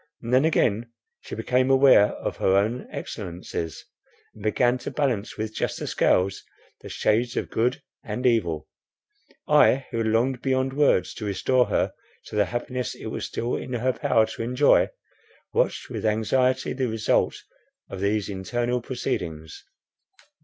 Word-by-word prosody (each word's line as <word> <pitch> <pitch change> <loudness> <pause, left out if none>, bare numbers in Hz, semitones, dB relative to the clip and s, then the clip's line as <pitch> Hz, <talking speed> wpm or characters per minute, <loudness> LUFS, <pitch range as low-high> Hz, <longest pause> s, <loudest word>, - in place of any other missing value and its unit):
And 115 +2 -3
then 130 +4 +5
again 115 -7 +1 0.3
she - - -8
became 125 +3 +1
aware 135 -6 +6
of - - -5
her 95 - +2
own 110 +6 0
excellencies, 85 -4 -6 0.5
and 110 - -15
began 120 +4 +2
to 120 - -5
balance 125 -8 -1
with 110 0 -4
juster - - -3
scales 95 +1 +1 0.4
the - - -9
shades 115 +2 0
of - - -2
good 125 +3 0 0.2
and 115 +4 -4
evil. 85 - +1 0.8
I, 135 +1 +5
who 115 - -1
longed 120 +3 +1
beyond 130 0 0
words, 140 -9 +2
to 110 - -6
restore 125 +5 +2
her - - 0 0.3
to - - -9
the 105 -1 +3
happiness 120 +4 -4
it - - -7
was - - -4
still 120 +1 -2
in 125 - -5
her 125 +2 0
power 110 -1 +2
to 110 - -7
enjoy, 125 +5 +3 0.6
watched - - 0
with - - -4
anxiety 125 +4 +1
the 130 -1 -1
result 110 -1 +1 0.5
of 95 - -7
these 100 +1 0
internal 120 +6 -2
proceedings. 80 - -4
115 Hz, 150 wpm, -25 LUFS, 105-125 Hz, 0.8 s, aware